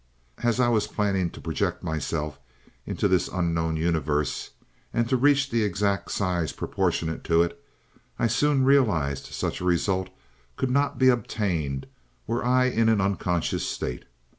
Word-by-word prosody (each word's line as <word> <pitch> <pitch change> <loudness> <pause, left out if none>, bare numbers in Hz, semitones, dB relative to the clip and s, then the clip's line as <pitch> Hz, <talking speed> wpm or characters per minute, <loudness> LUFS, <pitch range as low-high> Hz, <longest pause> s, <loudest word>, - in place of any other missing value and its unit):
"As 120 0 +1
I 125 - +4
was 110 -3 +2
planning 100 -4 0
to - - -12
project 90 +2 -2
myself 75 -3 -3 0.5
into - - 0
this 90 -2 +2
unknown 85 -3 -1
universe 80 -3 0 0.4
and 115 0 0
to 130 - +2
reach 140 +1 +4
the 115 -1 +2
exact 100 -1 0
size 90 -5 -1
proportionate 80 0 -1
to 85 0 +4
it, 85 - -5 0.5
I - - +1
soon 135 +4 +2
realized 90 - +2
such - - -3
a - - -3
result 95 +1 +1 0.5
could 130 - -1
not 140 +2 +1
be 130 -1 +5
obtained 90 - -1 0.4
were 115 +1 -1
I 125 +1 +3
in 115 -3 +2
an 110 -2 +3
unconscious 95 -3 0
state. 60 - -4
95 Hz, 150 wpm, -26 LUFS, 80-120 Hz, 0.5 s, be